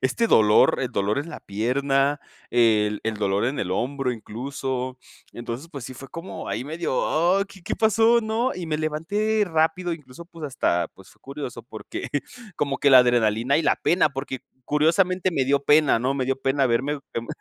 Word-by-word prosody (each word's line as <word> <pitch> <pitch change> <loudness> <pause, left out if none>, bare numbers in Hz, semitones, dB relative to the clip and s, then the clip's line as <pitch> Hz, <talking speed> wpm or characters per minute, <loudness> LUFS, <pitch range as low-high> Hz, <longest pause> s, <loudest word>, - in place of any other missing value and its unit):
este 130 - +1
dolor, 105 - +5
el - - -2
dolor 100 +5 0
en 145 +4 -4
la 155 - -7
pierna, 135 +7 0 0.3
el 110 -3 +3
el 115 0 -1
dolor 100 0 0
en 130 +4 -1
el 90 - -3
hombro, 130 +6 -1
incluso. 130 +3 -5 0.3
Entonces, 120 +6 -6
pues, 140 -6 -7
sí 130 - -8
fue 135 +2 -11
como 165 +6 -7
ahí 125 - -3
medio: 160 -1 -3
"Oh, 175 +5 +2
¿qué 195 -2 -15
qué - - -3
pasó?", 225 +2 +4
¿no? 225 +3 -1
Y 180 -2 -5
me 155 -1 -1
levanté 200 +8 0
rápido, 165 +1 0
incluso, 150 -1 -10
pues, 165 -2 -11
hasta, 105 -11 0
pues, 95 -2 -17
fue - - -24
curioso, 140 -2 -7
porque 110 -2 -7 0.5
como 140 -2 -1
que 140 - +3
la 130 - +9
adrenalina 120 +1 +3
y 165 - +1
la - - +2
pena, 175 -2 +2
porque 135 -2 -5 0.2
curiosamente 180 +6 +2
me 140 -6 0
dio 140 +1 +1
pena, 150 -3 +4
¿no? 130 +3 +1
Me 135 -2 -1
dio 135 +1 0
pena 135 0 +2
verme, 135 +5 0
em, 115 0 -4
140 Hz, 190 wpm, -24 LUFS, 120-165 Hz, 0.5 s, la